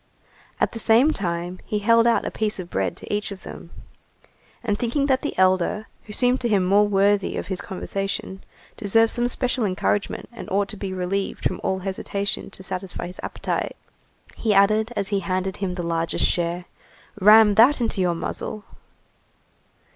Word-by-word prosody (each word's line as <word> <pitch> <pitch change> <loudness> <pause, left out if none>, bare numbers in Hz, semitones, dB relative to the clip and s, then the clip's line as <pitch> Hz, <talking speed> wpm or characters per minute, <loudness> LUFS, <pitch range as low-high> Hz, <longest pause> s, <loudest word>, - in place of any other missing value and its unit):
At - - +1
the 230 - -7
same 235 +8 +4
time, 175 -1 -3
he 210 - -2
held 230 +3 +4
out 235 - +2
a - - -3
piece 215 -1 -1
of 180 -2 -7
bread 95 -2 -1
to - - -6
each 205 0 -1
of 195 -1 -9
them. 170 - -10 0.9
And 210 -3 -1
thinking 245 +4 0
that 265 -2 +2
the 295 - -4
elder, 185 +3 +2 0.2
who 210 - -10
seemed 250 +3 +2
to 240 - 0
him 200 -4 +3
the 180 - -1
more 205 +1 +5
worthy 200 0 +2
of - - -3
his 190 -2 -4
conversation, 195 -1 -4 0.3
deserved 225 +2 +3
some 240 0 0
special 250 0 0
encouragement 200 +1 -1
and 190 -6 -9
ought 200 +1 0
to - - -4
be 195 -1 -5
relieved 190 +1 -3
from - - -1
all 190 - 0
hesitation 195 +1 -2
to 190 - -8
satisfy 185 -1 -3
his 180 +1 -6
appetite, - - -3 0.6
he 215 -3 0
added, 215 +3 +4
as 200 -2 -1
he 200 -2 +1
handed 185 +1 -2
him 190 -2 -3
the 175 - -4
largest 165 0 0
share:— 175 0 0 0.5
"Ram 210 +1 +7
that 245 +8 +5
into 225 -5 0
your 175 -2 +1
muzzle." 205 +5 -5
200 Hz, 180 wpm, -23 LUFS, 185-220 Hz, 0.9 s, Ram